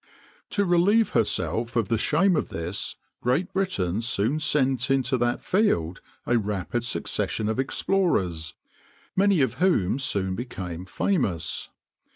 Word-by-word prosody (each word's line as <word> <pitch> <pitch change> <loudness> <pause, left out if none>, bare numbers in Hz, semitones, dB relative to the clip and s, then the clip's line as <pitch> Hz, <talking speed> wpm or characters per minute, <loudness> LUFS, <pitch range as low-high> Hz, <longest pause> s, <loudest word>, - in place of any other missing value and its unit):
To 200 - +1
relieve 195 +6 +4
herself 115 +2 0
of 115 -4 +1
the 115 - +1
shame 175 +9 +3
of - - -1
this 85 +4 -3 0.3
Great 130 +9 0
Britain 110 - 0
soon 120 +4 0
sent 135 -4 +1
into 135 -1 +2
that 120 0 0
field 95 - +1 0.2
a 120 -1 +2
rapid 105 +2 -2
succession 110 -2 -1
of 110 +3 -1
explorers, 95 - 0 0.6
many 195 -4 +4
of 130 -5 0
whom 135 - +2
soon 95 -8 -1
became 95 -6 -6
famous. 95 - -1
120 Hz, 130 wpm, -25 LUFS, -, 0.6 s, relieve